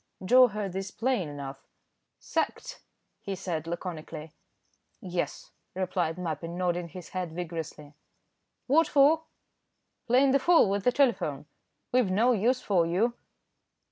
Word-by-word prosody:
Joe 250 +5 +7
heard 210 -4 -4
this 190 0 -4
plain 230 - -1
enough. 140 -1 -7 0.5
"Sacked!" - - -3 0.4
he 195 - -4
said, 170 -4 -4
laconically. 165 -2 -6 0.7
"Yes," 180 -5 -4 0.2
replied 180 -3 -1
Mappin, 170 -1 -4
nodding 175 -1 -1
his 175 +1 -10
head 180 -4 -4
vigorously. 160 -4 -6 0.7
"What 315 +5 +4
for?" 300 +3 +4 0.8
"Playing 260 +3 +4
the 275 - +4
fool 335 -2 +5
with 200 0 -1
the 250 - +5
telephone. 235 - +1 0.5
We've 245 -5 +3
no 220 +7 +3
use 245 +3 +2
for 175 -5 +2
you." 205 +8 +1
185 Hz, 125 wpm, -28 LUFS, 165-245 Hz, 0.8 s, Joe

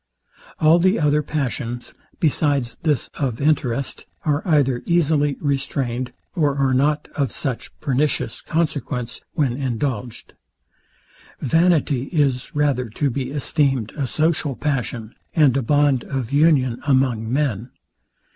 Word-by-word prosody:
All 160 +2 +5
the 185 +4 +3
other 150 -1 +3
passions, 125 -5 -3 0.3
besides 140 -6 +1
this 155 -5 0
of 125 -5 -1
interest, 140 -3 0 0.2
are 150 -1 +1
either 140 -6 +2
easily 150 -4 +2
restrained, 130 -3 -2 0.2
or 150 -6 +1
are 135 -1 +2
not 145 +3 +1
of 140 -3 0
such 130 -5 -4
pernicious 140 -4 0
consequence, 145 -6 -2
when 140 -7 +1
indulged. 125 -3 -3 1.1
Vanity 155 -3 +2
is 140 -6 0
rather 140 -5 +1
to 140 +6 -1
be 130 0 -3
esteemed 135 -4 0
a 140 -4 -2
social 155 -1 0
passion, 125 -6 -3 0.2
and 145 -6 +5
a 140 - +2
bond 145 0 +2
of 130 -3 -4
union 140 -5 +3
among 130 -5 +2
men. 130 -5 -1
140 Hz, 120 wpm, -21 LUFS, 125-150 Hz, 1.1 s, All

